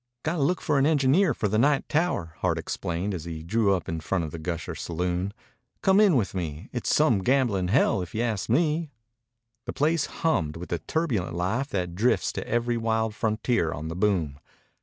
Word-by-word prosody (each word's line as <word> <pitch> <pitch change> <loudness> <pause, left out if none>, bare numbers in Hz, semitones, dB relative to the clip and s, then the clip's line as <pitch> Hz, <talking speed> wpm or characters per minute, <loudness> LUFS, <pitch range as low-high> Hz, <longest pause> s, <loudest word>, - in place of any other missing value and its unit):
"Got 165 +3 -1
to - - -1
look 165 +5 +1
for 145 - +1
an 135 - +4
engineer 155 +4 +3
for 105 - 0
the 105 +2 +1
night 140 +2 +2
tower," 150 - 0
Hart - - +1
explained 90 +4 -3
as 85 -3 -5
he 80 -2 -6
drew 100 +2 +2
up 90 - -5
in 80 0 -3
front 85 +3 -1
of 80 - -5
the 85 - -6
Gusher 85 +1 -4
Saloon. 90 +3 -2 0.5
"Come 195 +1 +5
in 205 -6 +5
with 105 -8 +1
me. 80 -5 -5
It's - - 0
some - - +4
gambling 115 -5 +1
hell, 95 0 +3
if 90 +1 -7
you 115 - 0
ask 110 -4 -2
me." 155 +4 +1 0.8
The - - -3
place 155 +1 +1
hummed 80 - -1
with 90 - -8
the 85 - -1
turbulent 115 - -1
life 105 +10 -1
that 90 -8 -3
drifts 110 +8 +1
to - - -5
every 120 +1 0
wild 110 -1 0
frontier 110 -5 0
on 80 +1 -5
the 80 - -5
boom. 90 -8 0
105 Hz, 200 wpm, -26 LUFS, 85-135 Hz, 0.8 s, Come